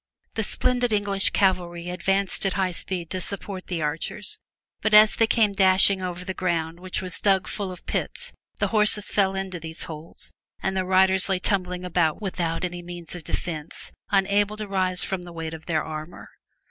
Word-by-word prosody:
The 225 - -1
splendid 245 +2 +1
English 205 -2 +2
cavalry 180 -3 +1
advanced 195 +2 0
at 190 - -1
high 190 -2 +1
speed 175 -1 -4
to 185 - -2
support 195 -1 -5
the 170 -4 -2
archers, 160 +7 -3 0.4
but 220 -1 +3
as 215 0 +8
they 225 - +3
came 215 -3 +3
dashing 190 0 +6
over 180 0 -4
the 190 - -3
ground 170 -2 -1
which 185 +1 -3
was 180 -2 -3
dug 195 -2 +3
full 200 -3 -3
of 180 - -11
pits 485 +1 -3 0.2
the - - 0
horses 210 -1 +2
fell 195 -1 +2
into 190 -2 -4
these 160 0 -6
holes, 160 +1 -6 0.3
and 190 - -1
the 185 -1 0
riders 190 +1 +4
lay 190 - +2
tumbling 180 -1 0
about 165 -3 +1
without 180 -4 -2
any 175 0 -5
means 175 -1 -8
of 175 -2 -7
defence, 155 -1 -5 0.2
unable 205 +1 +2
to 215 -1 -5
rise 185 -2 +1
from 190 -2 -2
the 175 0 -10
weight 165 -1 -5
of 160 0 -10
their 160 -2 +1
armor. 155 +2 -7
185 Hz, 185 wpm, -25 LUFS, 175-200 Hz, 0.4 s, as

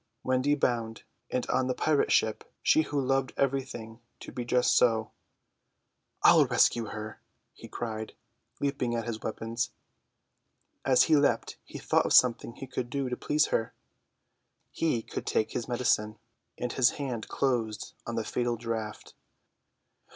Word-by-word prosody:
Wendy 130 +3 +2
bound, 115 -5 -1 0.3
and 125 - -1
on 130 -1 +1
the 130 - -1
pirate 155 -2 +1
ship; 110 -1 +2 0.2
she 155 - +5
who 145 -2 -2
loved 135 -1 0
everything 130 -5 -2 0.2
to - - -8
be 125 - -4
just 125 +1 +2
so! 115 -2 +3 1.1
"I'll - - +7
rescue 115 -1 +3
her!" 110 0 -7 0.3
he - - -12
cried, 110 -2 -5 0.5
leaping 140 -4 -1
at 115 -1 -2
his 115 -2 -4
weapons. 115 +1 -3 1.1
As 130 -2 +5
he 160 - +4
leapt 140 -5 +1
he - - -9
thought - - +1
of - - 0
something 120 -1 +4
he - - -7
could 125 -2 -4
do 135 0 -2
to 125 - -2
please 150 +4 +1
her. 115 - -1 1.0
He 130 -9 0
could - - -6
take 110 0 +1
his 120 - -3
medicine. 115 -3 0 0.4
His 125 0 +2
hand 125 -6 -4
closed 120 -5 -1
on 115 - -3
the 115 - -1
fatal 120 +2 -1
draught. 110 -2 -5
120 Hz, 145 wpm, -29 LUFS, 115-130 Hz, 1.1 s, I'll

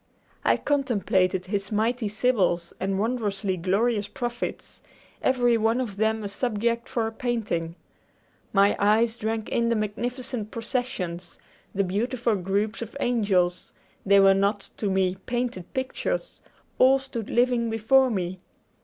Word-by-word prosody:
I - - +3
contemplated 195 -10 +1
his 200 +1 -3
mighty 225 +2 0
sibyls 200 -7 +1
and 190 +1 -1
wondrously 205 -3 -1
glorious 200 +4 +1
prophets, 240 +3 -5 0.4
every 245 -2 +3
one 225 +2 +2
of 220 -6 -3
them 220 +1 +1
a - - -2
subject 235 +2 -1
for 230 -2 0
a 225 - -2
painting. 220 -9 -2 0.8
My 200 0 +4
eyes 220 +3 +3
drank 220 -1 -3
in 235 0 +1
the 235 - +2
magnificent 225 +2 -3
processions, 215 -8 -4 0.4
the 200 - +2
beautiful 230 +5 0
groups 200 +4 -1
of 230 +4 -6
angels; 195 -8 +1 0.3
they 200 0 +5
were 195 0 +7
not, 200 +1 0
to 205 - -1
me, 190 -1 +1
painted 240 -7 -3
pictures; 265 - -3 0.4
all 265 +1 +6
stood 265 -5 -6
living 240 -1 +2
before 240 +4 +4
me. 185 -4 -2
220 Hz, 135 wpm, -26 LUFS, 195-240 Hz, 0.8 s, were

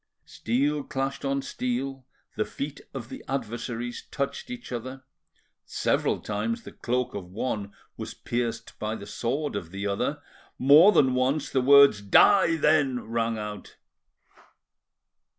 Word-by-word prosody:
Steel 140 +5 -1
clashed 135 0 -3
on 140 0 -1
steel, 130 +1 -3 0.3
the - - +1
feet 145 +1 -6
of 120 -4 -7
the - - -8
adversaries 120 -1 -4
touched 140 - -3
each 245 - -8
other, 130 +2 -6 0.6
several - - 0
times 110 +2 -3
the - - -10
cloak 125 +1 -2
of 95 -3 -6
one 100 0 -3 0.3
was - - -6
pierced 115 -1 -4
by 110 +1 -2
the 100 - -8
sword 125 +5 -2
of 90 -5 -4
the 100 +3 -5
other, 100 -1 -1 0.4
more 150 +9 +7
than 135 -9 +4
once 130 +3 0
the 130 - +2
words 140 -4 +7
"Die 165 - +5
then!" 150 -5 +2
rang 115 -1 0
out. 105 -1 -7
125 Hz, 135 wpm, -26 LUFS, 115-140 Hz, 0.6 s, more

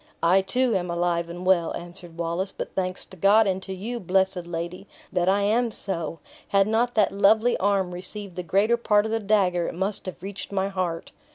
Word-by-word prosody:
"I, 180 +3 +5
too, 235 +4 +1
am 180 -2 -1
alive 170 0 0
and 175 +2 -7
well," 180 -3 +3
answered 175 -1 -10
Wallace; 170 +3 -2
"but - - -6
thanks 185 -1 -3
to 190 - -14
God, 205 +4 +5
and 190 -1 0
to 190 - -8
you, 220 +6 -4
blessed 190 -2 0
lady, 175 +3 -5 0.3
that 180 0 +2
I 200 +1 +3
am 230 +4 +2
so! 170 -6 -3 0.3
Had 195 -1 +3
not 235 +3 +1
that 215 -2 +3
lovely 215 +4 +4
arm 195 -2 +1
received 185 +1 -8
the 180 - -3
greater 200 +7 +2
part 210 -3 +2
of 220 - -3
the 225 - +1
dagger, 195 -5 +2
it - - -5
must 195 +2 -3
have 185 -1 -7
reached 200 +1 -6
my 195 0 0
heart." 180 -4 -3
190 Hz, 205 wpm, -25 LUFS, 175-205 Hz, 0.3 s, I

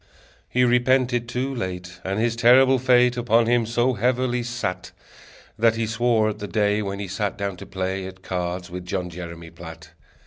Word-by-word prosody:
He 125 - +2
repented 125 0 +2
too 130 +3 -2
late, 90 -5 -6
And 95 +2 -2
his 115 0 +1
terrible 130 +3 +5
fate 125 -1 +4
Upon 115 -1 +3
him 120 -1 +2
so 120 +2 +1
heavily 125 +2 0
sat, 120 -7 -4 0.7
That 115 0 +4
he 115 0 -1
swore 115 0 +1
at 105 - -6
the 105 - -5
day 105 +2 +1
When 100 -1 -4
he 100 0 -5
sat 100 +2 -3
down 100 -1 -3
to - - -10
play 95 0 -3
At 95 0 -12
cards 90 -1 -4
with 90 0 -6
John 90 -1 -3
Jeremy 85 -1 -8
Platt. 80 -2 -11
110 Hz, 180 wpm, -23 LUFS, 95-120 Hz, 0.7 s, terrible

